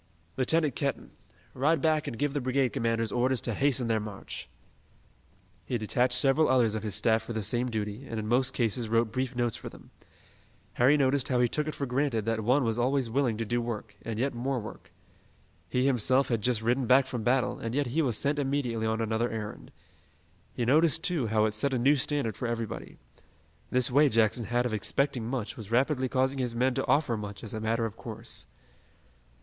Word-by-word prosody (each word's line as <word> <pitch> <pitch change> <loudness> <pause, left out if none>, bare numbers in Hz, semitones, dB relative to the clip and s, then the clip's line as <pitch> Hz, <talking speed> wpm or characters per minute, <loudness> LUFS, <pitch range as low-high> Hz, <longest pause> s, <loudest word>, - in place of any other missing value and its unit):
Lieutenant 150 +2 +2
Kenton, 140 -1 -3 0.4
ride 150 +5 +2
back 155 +1 +1
and 115 - -5
give 145 +3 -1
the 145 - -1
brigade 130 +1 +1
commanders 115 -1 0
orders 125 +1 +1
to 120 - -2
hasten 130 0 +1
their 110 -1 +1
march." 105 -2 -7 1.1
He 125 - -2
detached 125 +3 +1
several 140 +3 +3
others 120 -4 +3
of 110 - -2
his 105 -2 -2
staff 110 -1 +2
for 120 - -6
the 110 -1 -2
same 120 +4 0
duty, 110 +3 -4
and 115 - -5
in 105 - -4
most 125 +3 +3
cases 115 -1 -1
wrote 115 0 +2
brief 130 +1 -2
notes 120 -2 0
for - - -7
them. - - -16 0.8
Harry 135 +5 +4
noticed 135 -1 +2
how 125 -2 +1
he 120 - +4
took 150 +5 -2
it 155 - -3
for 140 - -2
granted 125 -4 0
that 115 0 0
one 130 +5 +3
was 115 0 -1
always 130 -1 +1
willing 125 -3 +1
to 115 - -2
do 120 +3 0
work, 110 -3 -5
and 115 -2 -5
yet 135 +4 0
more 125 +2 -2
work. 105 -3 -10 0.8
He 125 +1 +1
himself 130 +1 +2
had 115 -3 0
just 115 0 0
ridden 120 +2 +1
back 130 +2 +5
from 125 -3 -4
battle, 125 +3 +1
and 115 +2 -4
yet 145 0 +1
he 135 +6 0
was 125 -8 +1
sent 145 +1 0
immediately 130 -5 -1
on 110 +1 -1
another 110 +2 0
errand. 105 - -6 0.8
He 120 - -2
noticed, 155 +5 +3
too, 160 -10 0
how 110 0 +2
it 110 - -1
set 130 +5 0
a - - +1
new 135 +5 +4
standard 135 -5 -1
for 125 - -3
everybody. 115 -1 -5 0.7
This 125 0 +2
way 145 +3 +5
Jackson 115 0 +2
had 120 +3 0
of 120 - -2
expecting 120 +2 0
much 120 -4 -3
was 105 -3 -9
rapidly 130 +2 +1
causing 130 +1 0
his 125 -2 -2
men 130 +2 +2
to 135 +1 -2
offer 145 -5 +2
much 105 0 -7
as 110 - -6
a 110 - -3
matter 115 +1 0
of 110 -1 -5
course. 115 -1 -7
120 Hz, 210 wpm, -28 LUFS, 115-135 Hz, 1.1 s, back